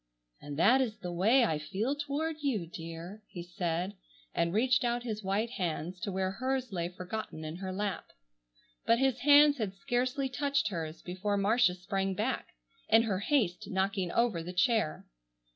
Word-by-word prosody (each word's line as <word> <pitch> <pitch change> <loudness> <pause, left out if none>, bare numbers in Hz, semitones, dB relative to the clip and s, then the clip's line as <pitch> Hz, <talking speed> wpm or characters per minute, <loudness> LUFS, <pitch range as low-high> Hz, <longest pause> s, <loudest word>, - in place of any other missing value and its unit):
"And 145 -1 -7
that 245 +11 +5
is 225 -4 -2
the 180 - -5
way 220 +9 +4
I 155 -8 0
feel 205 - -2
toward 300 +2 -2
you, 245 -11 0
dear," 165 +4 -8
he 175 - -7
said, 175 +1 -2 0.4
and 170 0 +1
reached 245 +6 +3
out 240 0 0
his 215 -3 -4
white 205 +5 0
hands 180 -3 -3
to 210 -1 -3
where 190 0 -1
hers 255 +2 -2
lay 170 -1 -1
forgotten 180 -2 -6
in 155 +2 -5
her 190 0 -4
lap. 200 +1 -2 0.8
But 230 - +5
his 265 -1 +2
hands 290 0 +6
had 200 -3 -2
scarcely 255 +6 -1
touched 280 -1 0
hers, 165 -4 -5
before 190 +3 -2
Marcia 205 -1 +3
sprang 195 +1 -2
back, - - -1 0.4
in 225 +1 +6
her 200 -5 -1
haste 205 - 0
knocking 190 -1 0
over 230 -8 +2
the 175 +2 -6
chair. 220 - +1
200 Hz, 170 wpm, -31 LUFS, 180-245 Hz, 0.8 s, hands